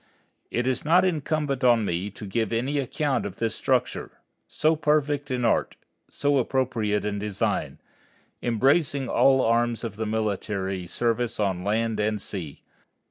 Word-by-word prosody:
It 120 Hz, -, -1 dB
is 130 Hz, -1 st, 0 dB
not 175 Hz, +4 st, +4 dB
incumbent 150 Hz, -5 st, -1 dB
on 120 Hz, -3 st, +4 dB
me 90 Hz, +2 st, -2 dB
to 105 Hz, +1 st, -10 dB
give 110 Hz, +2 st, -1 dB
any 130 Hz, +6 st, 0 dB
account 140 Hz, +1 st, -1 dB
of 100 Hz, -2 st, -5 dB
this 115 Hz, 0 st, -1 dB
structure, -, -, -1 dB, 0.3 s
so 155 Hz, +2 st, +2 dB
perfect 150 Hz, -1 st, +1 dB
in 125 Hz, -2 st, -1 dB
art, 115 Hz, -, +1 dB, 0.3 s
so 145 Hz, -1 st, +1 dB
appropriate 115 Hz, -5 st, 0 dB
in 105 Hz, -1 st, -2 dB
design, 105 Hz, -1 st, -1 dB, 0.6 s
embracing 135 Hz, +3 st, +2 dB
all 135 Hz, +2 st, +4 dB
arms 120 Hz, 0 st, +1 dB
of 110 Hz, -3 st, -5 dB
the 110 Hz, -1 st, -2 dB
military 100 Hz, -4 st, -2 dB
service 120 Hz, +3 st, -1 dB
on 95 Hz, -4 st, 0 dB
land 110 Hz, +2 st, 0 dB
and 105 Hz, 0 st, 0 dB
sea. 90 Hz, -7 st, -7 dB
115 Hz, 145 wpm, -25 LUFS, 105-135 Hz, 0.6 s, not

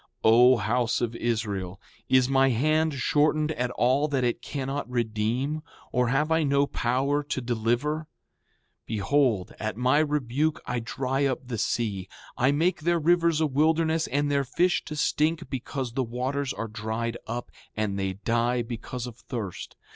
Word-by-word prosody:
O 125 Hz, +3 st, +7 dB
house 115 Hz, +2 st, 0 dB
of 120 Hz, -1 st, -2 dB
Israel, 105 Hz, -6 st, -2 dB, 0.3 s
is 130 Hz, -1 st, +5 dB
my 135 Hz, 0 st, +4 dB
hand 155 Hz, +5 st, +2 dB
shortened 150 Hz, +3 st, +2 dB
at 125 Hz, -4 st, -1 dB
all 130 Hz, +4 st, +2 dB
that 135 Hz, -4 st, 0 dB
it 120 Hz, -1 st, 0 dB
cannot 135 Hz, -2 st, -4 dB
redeem, 120 Hz, +5 st, -1 dB, 0.3 s
or 125 Hz, -1 st, +2 dB
have 150 Hz, +6 st, +1 dB
I 160 Hz, 0 st, +3 dB
no 140 Hz, -1 st, +3 dB
power 135 Hz, +3 st, 0 dB
to 145 Hz, -2 st, -3 dB
deliver? 120 Hz, +6 st, -1 dB, 0.8 s
Behold, 110 Hz, -1 st, +1 dB
at 110 Hz, -1 st, -3 dB
my 130 Hz, +4 st, +3 dB
rebuke 150 Hz, 0 st, 0 dB
I 120 Hz, 0 st, -2 dB
dry 130 Hz, +4 st, -1 dB
up 130 Hz, -1 st, -2 dB
the 115 Hz, -4 st, -3 dB
sea, 100 Hz, -6 st, -1 dB, 0.3 s
I 130 Hz, +3 st, +3 dB
make 165 Hz, +6 st, +1 dB
their 170 Hz, +2 st, +2 dB
rivers 170 Hz, 0 st, +3 dB
a -, -, +4 dB
wilderness 160 Hz, +3 st, +2 dB
and 145 Hz, +1 st, 0 dB
their 140 Hz, -1 st, +2 dB
fish 175 Hz, +7 st, +1 dB
to 155 Hz, -, -6 dB
stink 155 Hz, +2 st, 0 dB
because 130 Hz, -1 st, -4 dB
the 130 Hz, +1 st, 0 dB
waters 130 Hz, +3 st, -2 dB
are 115 Hz, -, -4 dB
dried 110 Hz, +2 st, -3 dB
up, 120 Hz, +2 st, -5 dB, 0.3 s
and 100 Hz, -2 st, -1 dB
they 95 Hz, -1 st, -1 dB
die 120 Hz, +4 st, 0 dB
because 120 Hz, +1 st, -6 dB
of 120 Hz, -2 st, -9 dB
thirst. 110 Hz, -8 st, -6 dB
130 Hz, 160 wpm, -26 LUFS, 115-145 Hz, 0.8 s, O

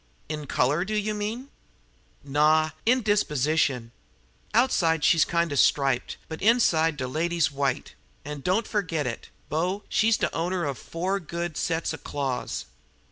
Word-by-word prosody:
"In 150 Hz, -1 st, -5 dB
color, 145 Hz, +8 st, +1 dB
do 215 Hz, +3 st, -3 dB
you 215 Hz, 0 st, 0 dB
mean?" 220 Hz, +6 st, -4 dB, 0.7 s
"Naw 155 Hz, +2 st, +3 dB, 0.2 s
in 250 Hz, +1 st, +4 dB
disposition. 150 Hz, -, +1 dB, 0.6 s
Outside, 170 Hz, -, +2 dB
she's 165 Hz, -, +5 dB
kind 170 Hz, -1 st, 0 dB
of 140 Hz, -, 0 dB
striped, 135 Hz, -3 st, +2 dB
but 160 Hz, -, -7 dB
inside, 165 Hz, -9 st, +3 dB
de 130 Hz, -2 st, -3 dB
lady's 165 Hz, +2 st, 0 dB
white; 140 Hz, -1 st, -2 dB, 0.3 s
an' 150 Hz, 0 st, -5 dB
don't 190 Hz, +9 st, +1 dB
yer -, -, -13 dB
fergit 165 Hz, -5 st, -2 dB
it, 115 Hz, -2 st, -5 dB, 0.2 s
bo, 180 Hz, +7 st, -1 dB
she's 220 Hz, 0 st, +3 dB
de -, -, -1 dB
owner 175 Hz, +1 st, -1 dB
of 140 Hz, -2 st, -3 dB
four 185 Hz, +4 st, -2 dB
good 170 Hz, -1 st, -4 dB
sets 165 Hz, -1 st, -1 dB
of 160 Hz, -, -9 dB
claws. 135 Hz, -3 st, -3 dB
160 Hz, 150 wpm, -26 LUFS, 145-190 Hz, 0.7 s, she's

